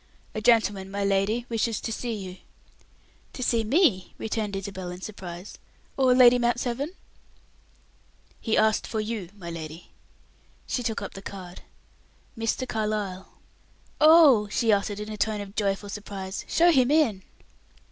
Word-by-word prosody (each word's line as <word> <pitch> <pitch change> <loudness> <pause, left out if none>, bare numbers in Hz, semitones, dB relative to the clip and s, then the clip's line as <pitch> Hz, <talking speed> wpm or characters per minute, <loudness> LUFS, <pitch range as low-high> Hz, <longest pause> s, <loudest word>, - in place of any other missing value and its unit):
"A 215 - -4
gentleman, 210 -4 +3
my 200 0 -2
lady, 200 +4 +1
wishes 230 -1 -1
to 225 - -4
see 235 +1 -3
you." 190 -3 -7 1.0
"To 255 - -5
see 230 -2 +2
me!" 225 - +2
returned 215 -2 -3
Isabel, 190 -2 -5
in 180 0 -7
surprise, 185 -2 -8 0.4
"or 260 -2 +4
Lady 250 -1 +7
Mount 240 0 +1
Severn?" 260 +7 -3 1.5
"He 225 - 0
asked 215 0 +2
for 220 - -3
you, 215 -4 -4
my 170 -3 -7
lady." 160 0 -8 0.7
She 250 - -2
took 225 -4 -2
up 200 - -7
the 195 - -9
card. 185 -3 -9 0.7
"Mr. 225 +3 -2
Carlyle." 210 -4 -3 0.7
"Oh!" 305 -9 +7
she 225 +2 +1
uttered, 205 0 -1
in 210 +1 -6
a 215 - -6
tone 215 0 0
of 200 0 -8
joyful 200 -1 -1
surprise, 200 -1 -6
"show 345 +1 +4
him 260 -5 +4
in." 285 -11 +2
215 Hz, 145 wpm, -26 LUFS, 195-240 Hz, 1.5 s, Lady